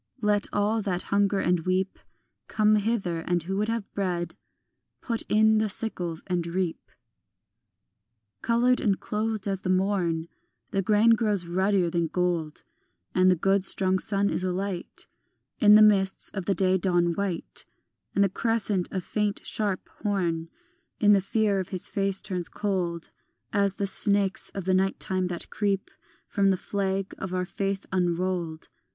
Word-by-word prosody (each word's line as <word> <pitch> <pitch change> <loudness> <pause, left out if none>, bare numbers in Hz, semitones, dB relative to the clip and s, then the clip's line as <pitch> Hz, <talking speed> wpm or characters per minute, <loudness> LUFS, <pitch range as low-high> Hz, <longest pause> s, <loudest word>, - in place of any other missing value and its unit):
Let 205 -1 +2
all 210 +2 +1
that 185 -3 -2
hunger 200 0 +2
and 180 -1 +2
weep 185 +3 -1 0.5
Come 215 0 +3
hither, 200 -6 -1
and 175 0 -1
who 190 +3 -3
would 210 +1 0
have 225 -2 -3
bread 180 -3 -2 0.7
Put 230 -2 -2
in 220 0 +4
the 215 -1 0
sickles 180 -6 -3
and 180 -2 -1
reap. 175 -1 -3 1.5
Coloured 245 +2 +2
and 200 -4 +1
clothed 215 -1 -2
as 195 -1 -2
the 185 - -3
morn, 185 -4 +1 0.4
The 195 - +1
grain 210 +3 +4
grows 210 -5 +1
ruddier 185 0 +1
than 170 -1 0
gold, 170 -3 -2 0.5
And 185 0 +4
the 180 - +5
good 195 +3 +2
strong 190 -1 +1
sun 200 +1 0
is - - -2
alight 185 0 -3 0.5
In 210 0 +7
the 215 - +8
mists 195 -2 +3
of 190 -3 -5
the 195 - +1
day 190 -1 +2
dawn 175 -1 +2
white, 190 -2 -4 0.5
And 200 - +4
the 195 - +2
crescent, 210 -3 0
a 190 - -3
faint 210 +2 -2
sharp 205 -4 -2
horn, 170 -6 -1 0.5
In 210 -1 +5
the 200 -1 +5
fear 205 0 +1
of 185 - -4
his 185 -2 -3
face 195 -2 0
turns 185 -4 -2
cold 180 -5 -2 0.4
As 200 -2 +2
the 200 - -1
snakes 200 0 +3
of 195 -3 -4
the 185 - +2
night 190 +1 +1
time 185 -1 0
that 175 -1 -5
creep 200 -2 -1 0.4
From 200 - 0
the 190 - +2
flag 195 0 -2
of 185 -1 -4
our 180 0 -1
faith 195 +1 -3
unrolled. 175 -2 -1
195 Hz, 160 wpm, -26 LUFS, 180-205 Hz, 1.5 s, the